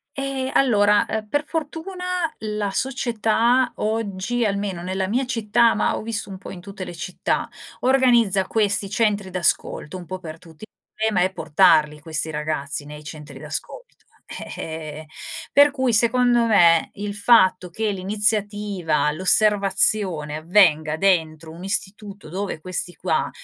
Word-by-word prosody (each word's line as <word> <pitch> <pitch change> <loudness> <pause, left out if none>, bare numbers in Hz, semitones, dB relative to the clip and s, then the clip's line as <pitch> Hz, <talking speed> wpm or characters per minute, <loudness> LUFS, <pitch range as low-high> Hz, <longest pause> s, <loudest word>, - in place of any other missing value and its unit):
Ehm, 270 -1 -3
allora, 210 -5 +4
uhm, 220 -1 -3
per 290 +6 -1
fortuna, 325 +4 -5 0.3
la 210 -2 -3
società 240 +1 +1
oggi, 220 +2 -2
almeno 200 -3 -2
nella 190 +1 -2
mia 250 +7 0
città, 230 -1 +2
ma - - 0
ho - - -4
visto 220 -1 -4
un 190 - -7
po' - - -11
in 185 - -9
tutte 195 0 -8
le 175 - -8
città, 180 +2 -2 0.3
organizza 240 -7 +3
questi 205 -2 +1
centri 205 -2 0
d'ascolto 175 -2 -1
un 180 - -9
po' 185 +2 -6
per 165 -3 -9
tutti, 165 +2 -16
il - - -68 0.3
problema 210 -5 +1
è - - -14
portarli 150 -3 +3
questi 160 0 -2
ragazzi 150 -1 -3
nei 150 +1 -10
centri 150 -1 -9
d'ascolto. - - -6 0.4
Eh, - - -7
eh, 155 -1 -7 0.5
per 285 0 +6
cui 260 -4 0
secondo 240 +1 +3
me 170 -6 +4
il 205 0 -5
fatto 190 -4 +4
che 215 +4 -2
l'iniziativa, 205 -5 0
l'osservazione 190 -3 +2
avvenga 155 -2 +3
dentro 160 -4 0
un 170 +3 -11
istituto 200 0 -4
dove 190 +1 -4
questi 180 +1 -3
qua - - -1
200 Hz, 145 wpm, -22 LUFS, 170-225 Hz, 0.5 s, per